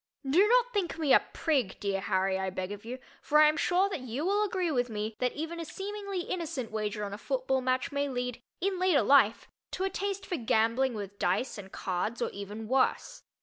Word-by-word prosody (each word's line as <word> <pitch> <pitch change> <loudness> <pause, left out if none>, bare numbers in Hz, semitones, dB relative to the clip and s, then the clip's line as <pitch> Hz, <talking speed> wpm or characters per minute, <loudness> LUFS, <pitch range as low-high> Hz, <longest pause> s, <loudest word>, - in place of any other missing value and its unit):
Do 355 +10 +5
not - - +3
think 370 -6 -1
me 310 -4 +3
a - - +9
"prig," 270 - 0
dear 200 -2 -1
Harry, 190 0 +1
I 190 0 -1
beg 185 +1 -4
of 205 0 -7
you, 240 +3 -6 0.2
for 300 - +2
I 305 0 +8
am 305 - +3
sure 360 +4 +2
that 380 - -3
you 255 +5 -3
will 405 +3 +2
agree 370 -4 0
with 245 -3 0
me 215 0 -3
that 250 -1 0
even 325 +3 -5
a - - -3
seemingly 395 +2 -4
innocent 330 -10 -4
wager 210 -1 -2
on 200 -1 -4
a 205 - -6
football 265 +1 0
match 255 0 0
may 285 0 -1
lead 250 -1 -3 0.2
in 380 0 -1
later 365 -6 +4
life 265 -6 +4 0.3
to 375 - -2
a 385 - 0
taste 395 0 -3
for 355 - -2
gambling 230 +1 +2
with 200 -1 -7
dice 200 +6 0
and 190 -1 -10
cards 195 +5 -2
or - - -1
even 205 +2 -7
worse. 260 +2 +1
260 Hz, 220 wpm, -30 LUFS, 215-350 Hz, 0.3 s, a